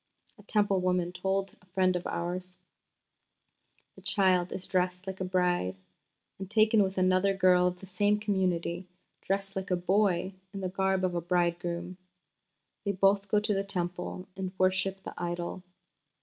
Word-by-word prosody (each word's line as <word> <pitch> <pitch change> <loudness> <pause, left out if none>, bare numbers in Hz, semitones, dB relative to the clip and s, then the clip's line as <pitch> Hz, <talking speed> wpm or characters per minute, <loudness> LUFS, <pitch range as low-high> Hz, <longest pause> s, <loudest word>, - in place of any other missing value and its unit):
A - - -12
Temple 205 -2 +2
woman 180 -1 +1
herself 180 0 -11 0.3
told - - -23
a 185 - -25
friend 185 0 +2
of 180 - -2
ours: 180 +1 -4 1.4
"The - - -15
child 185 -3 +2
is 185 - -4
dressed 180 0 0
like 190 -1 -6
a - - +1
bride, 180 - +1 0.6
and 190 -1 -6
taken 215 0 +4
with 190 -1 0
another 185 +1 +3
girl 180 -1 +5
of 180 0 -3
the - - -8
same 205 +3 +1
community, 185 -3 -1 0.3
dressed 195 +1 -2
like 190 0 -3
a 180 - +3
boy 185 0 +1 0.2
in 195 - -4
the 185 - -1
garb 190 0 +1
of 185 -1 +1
a 170 - -1
bridegroom. 175 0 -1 0.9
They 200 - 0
both 195 +1 +3
go 210 +1 +3
to 210 0 0
the 195 0 0
Temple 180 -1 -4
and 190 -1 -4
worship 190 +1 +1
the - - -7
idol. 175 +1 -3
185 Hz, 165 wpm, -30 LUFS, 180-195 Hz, 1.4 s, girl